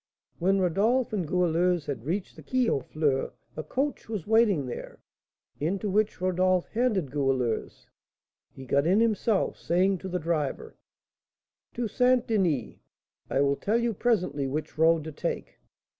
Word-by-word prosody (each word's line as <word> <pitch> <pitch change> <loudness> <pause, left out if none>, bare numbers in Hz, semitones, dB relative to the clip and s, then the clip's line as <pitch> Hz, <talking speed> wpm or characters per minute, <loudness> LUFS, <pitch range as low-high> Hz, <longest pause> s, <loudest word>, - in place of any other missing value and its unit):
When 190 +3 +2
Rodolph 215 +8 +1
and 185 -6 -1
Goualeuse 175 -1 +1
had 135 -4 -5
reached 180 +5 -3
the - - -12
Quai 255 -2 0
aux 140 - +2
Fleurs, 140 0 -1 0.2
a 155 - -3
coach 265 - -3
was 210 -7 -4
waiting 215 - +3
there, 125 - -7 0.6
into 190 +6 -1
which 215 +2 +1
Rodolph 185 0 +1
handed 215 - 0
Goualeuse. 135 -5 -1 0.6
He 130 - -11
got 140 +4 +2
in 190 +4 +4
himself, 225 -2 +1
saying 185 +2 +1
to 190 - -6
the 180 - -1
driver: 170 - -2 1.0
"To 235 -1 -1
St. 250 +3 +2
Denis; 170 - 0 0.5
I 135 - +1
will 140 0 +2
tell 215 +3 +1
you 235 -1 0
presently 180 - 0
which 150 +3 -4
road 160 0 +4
to 160 - -6
take." - - -4
180 Hz, 150 wpm, -27 LUFS, 150-215 Hz, 1.0 s, in